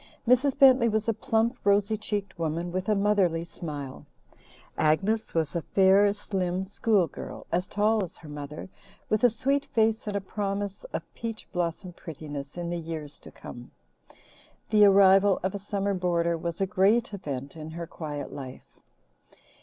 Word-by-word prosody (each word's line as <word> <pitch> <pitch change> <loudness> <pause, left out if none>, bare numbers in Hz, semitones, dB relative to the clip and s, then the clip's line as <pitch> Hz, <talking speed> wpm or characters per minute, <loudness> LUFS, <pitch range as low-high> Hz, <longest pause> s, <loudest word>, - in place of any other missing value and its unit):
Mrs. 255 +3 +3
Bentley 260 -4 +6
was 220 0 -1
a 225 - +2
plump, 230 0 0
rosy 200 +1 +3
cheeked 205 -3 -4
woman 165 +2 -2
with 185 +3 -3
a 210 - +4
motherly 195 -5 +2
smile. 145 -6 -7 0.7
Agnes 190 +9 +1
was 160 -1 0
a 170 - 0
fair, 195 +3 +4
slim 190 -2 -2
schoolgirl, 200 -2 -1
as 180 +2 0
tall 210 +1 +2
as 180 - -8
her 160 - -13
mother, 150 +2 -7 0.4
with 215 +1 +1
a 245 - +7
sweet 275 +5 0
face 220 -1 +1
and 205 - -2
a - - +1
promise 200 - -4
of - - -5
peach 225 -1 -6
blossom 175 +1 -3
prettiness 150 -3 -8
in 175 0 -3
the 175 - -2
years 155 -3 -7
to - - -13
come. 120 0 -11 1.0
The 210 -1 +7
arrival 195 0 +6
of 190 - -1
a 200 - -4
summer 200 0 -2
boarder 170 -2 +1
was 165 0 -4
a 195 - +2
great 205 +5 +2
event 140 -7 -5
in 155 -1 -7
her 170 +1 -6
quiet 150 -3 -6
life. 130 -2 -10
190 Hz, 160 wpm, -27 LUFS, 165-210 Hz, 1.0 s, a